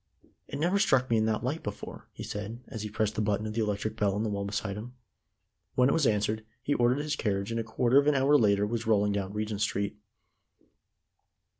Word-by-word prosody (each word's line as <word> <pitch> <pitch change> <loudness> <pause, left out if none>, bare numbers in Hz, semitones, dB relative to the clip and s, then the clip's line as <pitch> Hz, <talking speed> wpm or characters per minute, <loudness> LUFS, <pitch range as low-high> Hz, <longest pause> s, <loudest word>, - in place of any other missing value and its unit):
"It - - -5
never 175 +7 +2
struck 130 - +3
me 115 - +4
in 110 0 +2
that 110 +1 0
light 145 +6 -2
before," 105 - -7
he - - -8
said, 105 +4 -5
as 110 -5 -5
he 105 - -4
pressed 105 0 0
the 110 - -1
button 105 0 0
of 105 - -4
the 115 - 0
electric 110 +1 -2
bell 100 -3 +1
in 105 - 0
the 110 - -1
wall 100 0 -2
beside 100 0 -3
him. 120 +4 -8 0.8
When 125 +1 +4
it - - +3
was 155 -5 +3
answered, 110 +1 0 0.2
he 145 - +1
ordered 120 +1 +3
his 150 -1 -1
carriage, 100 -3 -1
and 115 - -1
a - - -1
quarter 120 +4 +3
of 145 - +1
an 150 - +4
hour 135 +2 +4
later 105 -5 +4
was 115 +1 -3
rolling 105 -2 +3
down 100 -1 -2
Regent 105 -1 -3
Street. 100 0 -1
110 Hz, 230 wpm, -29 LUFS, 105-125 Hz, 0.8 s, me